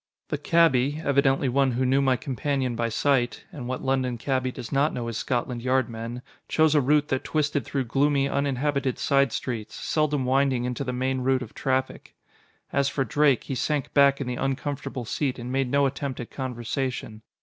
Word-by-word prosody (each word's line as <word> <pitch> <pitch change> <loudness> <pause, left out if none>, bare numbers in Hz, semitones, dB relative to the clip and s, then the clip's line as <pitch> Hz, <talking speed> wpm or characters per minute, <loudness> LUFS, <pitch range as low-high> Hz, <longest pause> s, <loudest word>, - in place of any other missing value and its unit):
The - - -2
cabby, 150 -4 +3
evidently 140 -1 +3
one 135 0 +2
who 130 +2 0
knew 135 +2 +3
my 130 -2 +3
companion 130 -1 -2
by 115 0 -1
sight 125 +1 +1
(and 125 -5 -7
what 130 0 -4
London 130 -2 0
cabby 130 +1 -1
does 120 - -8
not 140 +3 +2
know 120 - -3
his 115 -1 -3
Scotland 120 -1 -2
Yard 130 +1 +1
men!) 115 +2 -6 0.3
chose 155 -1 +3
a 150 - +4
route 150 +3 +2
that 130 - 0
twisted 150 -2 0
through 135 -2 -1
gloomy, 140 +3 +2
uninhabited 140 -1 0
side 140 -2 +2
streets, 115 -3 -4
seldom 150 -4 0
winding 130 -1 +2
into 125 +2 -2
the 130 - -3
main 130 +1 -1
route 130 0 +1
of 115 - -11
traffic. 130 0 -2 0.6
As 140 -1 +2
for 135 -1 -1
Drake, 145 -3 +3
he - - -5
sank 145 +1 -1
back 140 -1 +5
in 140 - -3
the 125 0 -3
uncomfortable 135 -2 -3
seat 135 +3 -1
and 120 0 -6
made 135 -1 0
no 140 +2 +3
attempt 135 -1 -3
at 120 - -7
conversation. 125 -3 -4
130 Hz, 190 wpm, -26 LUFS, 125-140 Hz, 0.6 s, back